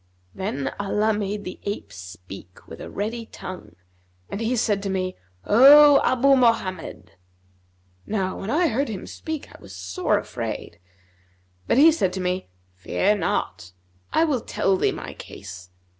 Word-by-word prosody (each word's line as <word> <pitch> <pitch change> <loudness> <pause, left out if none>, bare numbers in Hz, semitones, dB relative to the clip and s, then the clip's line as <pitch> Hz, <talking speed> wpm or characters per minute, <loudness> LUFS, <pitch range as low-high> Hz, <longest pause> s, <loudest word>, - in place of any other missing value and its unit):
Then 190 -9 -3
Allah 210 +2 +1
made 205 0 -3
the 180 - -7
ape 200 - -5
speak 90 0 -11
with - - -10
a - - -7
ready 225 +3 -4
tongue, 185 -4 -9 0.6
and 200 - -4
he 230 +3 0
said 210 -3 +1
to 200 - -3
me, 185 -1 -2 0.3
'O 280 +6 +8
Abu 265 +2 +4
Mohammed!' 185 - 0 1.0
Now 190 -3 -2
when 195 - -5
I 325 +6 +2
heard 270 +4 -1
him 200 -4 -6
speak, 315 -2 -7
I - - -14
was 95 - -12
sore 90 0 -1
afraid; 85 - -5 0.9
but - - +2
he 315 +4 +8
said 190 - 0
to 190 - -4
me, 180 0 -2 0.3
'Fear 195 - 0
not; 90 - -2 0.4
I 320 - +3
will 285 -7 +1
tell 195 -2 0
thee - - +1
my - - -7
case. 90 -2 -10
200 Hz, 155 wpm, -24 LUFS, 180-235 Hz, 1.0 s, O